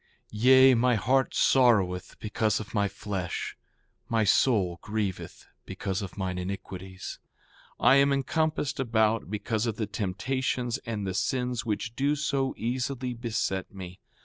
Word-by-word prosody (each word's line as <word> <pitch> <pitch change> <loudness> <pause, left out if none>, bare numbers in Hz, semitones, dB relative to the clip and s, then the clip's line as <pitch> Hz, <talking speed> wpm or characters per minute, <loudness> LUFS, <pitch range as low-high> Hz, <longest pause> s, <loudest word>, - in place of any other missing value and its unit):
Yea, 130 +4 +6
my 125 +1 +3
heart 130 +5 +1
sorroweth 100 -9 +3
because 110 0 0
of 110 +1 -8
my 100 -2 +2
flesh; 100 -3 -4 0.5
my 115 -1 +2
soul 100 -5 +2
grieveth 105 -3 -4 0.2
because 95 +1 -4
of 95 -1 -7
mine 90 -2 -2
iniquities. 95 0 -6 0.6
4:18 - - -3
I 130 - +8
am 140 0 +4
encompassed 150 +1 0
about, 115 -4 +1
because 110 +2 -1
of 110 - -1
the 110 - -2
temptations 120 +4 -2
and 105 -3 -3
the 95 - -2
sins 125 +4 -1
which 110 +2 -2
do 140 +3 +1
so 140 -2 -1
easily 125 +2 -2
beset 115 -5 -2
me. 90 -1 -8
110 Hz, 140 wpm, -28 LUFS, 100-130 Hz, 0.6 s, I